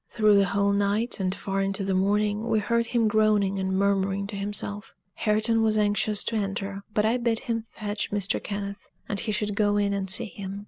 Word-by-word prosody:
Through 215 -2 +4
the 200 - +4
whole 200 +1 +1
night, 205 +4 +1
and 185 0 -1
far 195 -1 -2
into 195 0 -2
the 195 - 0
morning, 205 +3 +1
we - - +2
heard 235 +2 +1
him 235 -2 +2
groaning 210 -2 +2
and 190 0 -1
murmuring 200 0 +1
to 205 +1 -6
himself. 205 +1 -3 0.2
Hareton 220 +1 +1
was 220 -1 +2
anxious 210 0 +1
to 230 - -2
enter, 195 -1 -3
but 210 0 +1
I 225 +3 +2
bid 235 -2 0
him 230 -1 -3
fetch 205 -1 -4
Mr. 200 -1 0
Kenneth, 200 -1 -5 0.2
and 200 - -2
he 220 - -2
should 210 0 -1
go 205 -1 +2
in 200 -1 +1
and 195 -1 -2
see 235 +5 +2
him. 200 -2 -7
205 Hz, 210 wpm, -26 LUFS, 200-215 Hz, 0.2 s, Through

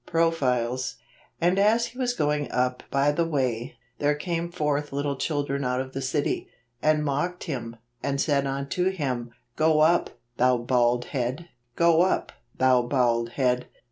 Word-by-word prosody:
Profiles. 130 -7 0 0.2
" - - -33
And 175 +3 +2
as 220 +3 +4
he 250 - -10
teas 245 -1 0
going 150 -5 0
up 125 0 0
by 140 +1 +2
the 170 +3 +1
way, 130 -8 -1 0.2
there 145 0 +2
came 170 +2 -3
forth 150 -3 -1
little 140 0 -1
children 140 -1 -2
out 125 0 0
of 130 0 -5
the 135 - -3
city, 140 +2 -1 0.3
and 155 0 +2
mocked 155 +6 -1
him, 120 -8 -5 0.3
and 140 -1 -1
said 140 -2 +1
unto 140 +7 -1
him, 130 -10 -3 0.2
Go 155 -1 +3
up, 170 +3 +4 0.3
thou 125 0 +4
bald 120 0 +1
head; 130 +6 -2 0.3
go 170 -1 +4
up, 185 +1 +1 0.3
thou 130 -1 +4
bald 120 -2 +1
head. 125 -2 +1
140 Hz, 160 wpm, -26 LUFS, 125-165 Hz, 0.3 s, as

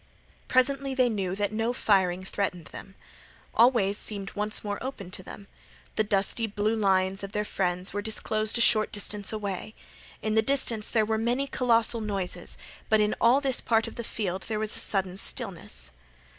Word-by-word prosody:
Presently 270 +1 +2
they 255 -2 +4
knew 190 -4 -2
that 205 0 -1
no 225 +2 0
firing 185 -5 +2
threatened 185 -3 -3
them. 190 - -10 0.6
All 235 +2 +7
ways 205 -5 0
seemed 200 -2 -3
once 210 +1 -1
more 205 -1 -3
opened 200 -9 -6
to - - -4
them. 200 +2 -10 0.5
The 215 - +2
dusty 205 +2 +1
blue 210 +1 0
lines 190 -2 +2
of 200 +1 -6
their 210 -1 -1
friends 180 -1 -1
were 205 - -1
disclosed 215 +1 +1
a - - +1
short 215 -2 +4
distance 205 -2 -3
away. 210 -1 -4 0.5
In 215 0 0
the 220 - +5
distance 235 -4 +1
there 220 -2 +2
were 220 0 0
many 240 +4 +1
colossal 235 -3 +2
noises, 195 -4 -4 0.3
but 220 - +4
in 210 0 +2
all 245 +4 +5
this 265 -3 +1
part 225 -1 +2
of - - -8
the 235 - -5
field 190 -4 -3
there 220 - -2
was 215 0 -2
a - - 0
sudden 190 -2 0
stillness. 170 - -5
215 Hz, 185 wpm, -27 LUFS, 195-230 Hz, 0.6 s, All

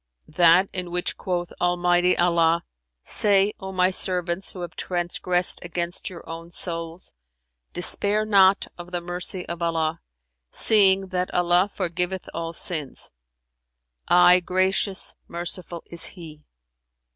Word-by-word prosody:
"That 175 +3 +4
in 180 -2 -4
which 175 0 -1
quoth 175 -2 -4
Almighty 175 0 +2
Allah, 170 -1 +2 0.4
'Say: 205 0 +4
O 190 -1 -7
my 185 0 +1
servants 180 0 0
who 185 - -9
have 175 -2 -8
transgressed 180 0 0
against 175 +1 -4
your 175 -3 -12
own 165 +1 -9
souls, 170 0 -5 0.6
despair 205 +4 +2
not 195 -2 +4
of 175 0 -9
the 180 -1 -3
mercy 175 +1 -3
of 170 0 -7
Allah; 165 -1 -2 0.5
seeing, 195 - +4
that 180 -1 -3
Allah 180 +2 +2
forgiveth 180 0 -3
all 165 0 -5
sins; 155 -5 -3 1.0
aye 180 +1 +6
Gracious, 185 +2 0
Merciful 175 0 -6
is 170 -1 +1
He.'" 155 -4 -11
175 Hz, 120 wpm, -23 LUFS, 170-185 Hz, 1.0 s, aye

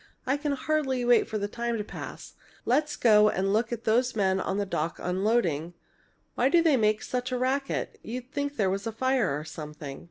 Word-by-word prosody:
I 265 - +2
can 290 0 -1
hardly 270 -3 0
wait 240 -1 +4
for 220 - -2
the 205 -1 -2
time 235 +2 -2
to 210 - -2
pass! - - -8 0.3
Let's 295 +4 +1
go 210 -2 +5
and 195 0 0
look 220 +2 +1
at 235 -1 -4
those 245 +2 +2
men 190 -2 +2
on 190 +1 -2
the 205 - 0
dock 165 -3 -2
unloading. 180 -4 0 0.6
Why 255 - +2
do 340 - +5
they 320 -4 +4
make 215 -3 +2
such 250 0 -3
a 250 - 0
racket? 265 +2 -1
You'd 250 +3 -7
think 285 -1 -2
there 195 -6 +1
was 195 +3 -3
a - - -2
fire 230 - +1
or - - -7
something!" 150 -3 -8
230 Hz, 210 wpm, -27 LUFS, 195-260 Hz, 0.6 s, go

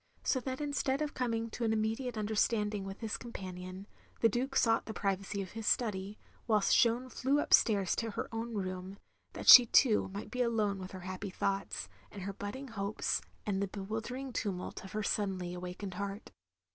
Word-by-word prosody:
So 260 - +2
that 260 +1 -4
instead 285 -1 0
of 295 - -4
coming 230 -2 -1
to 240 - -4
an 225 - +2
immediate 225 +3 -1
tmderstanding 210 -1 0
with 195 +3 -7
his 220 -2 -2
companion, 185 -4 -7 0.4
the 230 - +6
Duke 255 +5 -2
sought 225 -1 +3
the 220 - -5
privacy 195 0 -1
of 185 - -10
his 225 -1 -5
study, 205 -3 0 0.3
whilst 210 -3 +4
Jeanne 240 +2 +3
flew 270 +3 +1
up - - 0
stairs 200 -4 +4
to 230 - -1
her 210 - -4
own 230 0 -4
room, 185 0 -4 0.4
that - - -7
she 245 -2 +12
too, 225 -2 +5
might 200 +2 -7
be 250 - -1
alone 215 -4 +1
with 185 0 -8
her 185 - -7
happy 185 +2 -5
thoughts, 190 - -2 0.2
and 200 - -8
her 200 +1 -4
budding 255 +8 -6
hopes, 205 -1 -1 0.2
and 195 -2 0
the 200 - 0
bewildering 220 +7 -5
tumtdt 190 -5 -3
of 190 - -10
her 215 0 -1
suddenly 190 -4 -1
awakened 180 +2 -6
heart. 200 +2 -5
210 Hz, 185 wpm, -33 LUFS, 195-235 Hz, 0.4 s, she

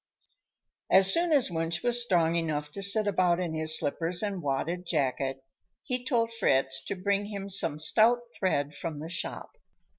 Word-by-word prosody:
As 190 0 +7
soon 340 0 +1
as 275 - +3
Wunsch 165 0 -3
was 240 0 +2
strong 170 -7 +1
enough 150 -3 -3
to 200 - -5
sit 200 +2 +5
about 180 -3 +1
in 175 -3 -4
his 160 0 +3
slippers 165 +5 -1
and 200 -3 -4
wadded 155 +5 -3
jacket, 135 -3 -2 0.4
he 250 -3 -4
told 230 -3 -1
Fritz 135 -10 0
to - - -4
bring 200 +2 -2
him 200 -1 -7
some 165 -6 +2
stout 225 +9 +3
thread 145 -6 -2
from 160 0 -7
the 155 +2 -8
shop. 170 - -5
175 Hz, 170 wpm, -27 LUFS, 155-205 Hz, 0.4 s, As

